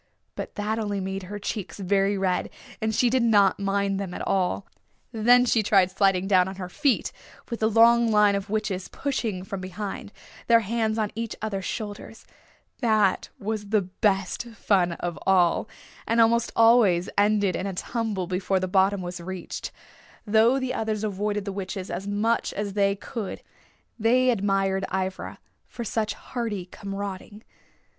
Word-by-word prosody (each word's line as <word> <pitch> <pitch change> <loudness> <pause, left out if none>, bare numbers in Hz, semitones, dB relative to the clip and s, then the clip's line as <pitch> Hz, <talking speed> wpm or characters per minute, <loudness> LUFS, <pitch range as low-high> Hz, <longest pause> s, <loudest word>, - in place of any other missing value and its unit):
But - - -7
that 215 +2 -2
only 205 -2 -2
made 190 0 -3
her 205 - -5
cheeks 205 -1 -5
very 195 +1 +1
red, 190 -1 0 0.3
and 220 0 0
she 250 - +3
did 255 +2 +2
not 205 -5 +4
mind 200 0 0
them 190 -3 -5
at - - -5
all. 190 0 0 0.5
Then 245 +2 +5
she 230 -2 +3
tried 195 -3 +3
sliding 195 -1 +2
down 185 -2 +4
on 190 - -6
her 185 -2 -6
feet, 280 - +1 0.4
with 235 - -3
the 220 - +2
long 230 +1 +5
line 210 -1 +4
of 200 0 -3
witches 205 -3 -2
pushing 225 -9 -3
from 190 0 -6
behind, 195 +2 -6 0.4
their 230 -1 +6
hands 220 +1 -1
on 215 -2 -1
each 230 0 -4
other's 200 -3 -3
shoulders. 215 0 -6 0.5
That 215 -6 +2
was 205 0 -4
the 215 -2 +2
best 195 +2 -1
fun 180 -6 +2
of 175 0 -5
all, 185 +2 +3 0.4
and 230 +1 +2
almost 230 +1 +3
always 225 -6 +5
ended 205 -2 +2
in 190 - -3
a 195 - -3
tumble 215 -2 -2
before 185 +1 0
the 185 - -2
bottom 190 +1 +2
was 175 0 -6
reached. 185 0 -6 0.5
Though 225 +5 +4
the 260 -1 -2
others 220 -1 -2
avoided 205 0 -2
the 200 - -3
witches 190 -1 -5
as 195 +2 -4
much 215 +3 0
as 205 -1 -3
they 200 -1 +2
could 205 0 -6 0.6
they 250 +3 +4
admired 195 -3 0
Ivra 190 0 -3 0.3
for 235 - -6
such 220 -1 -2
hardy 225 -7 -4
comrading. 200 +2 -7
205 Hz, 165 wpm, -25 LUFS, 190-220 Hz, 0.6 s, their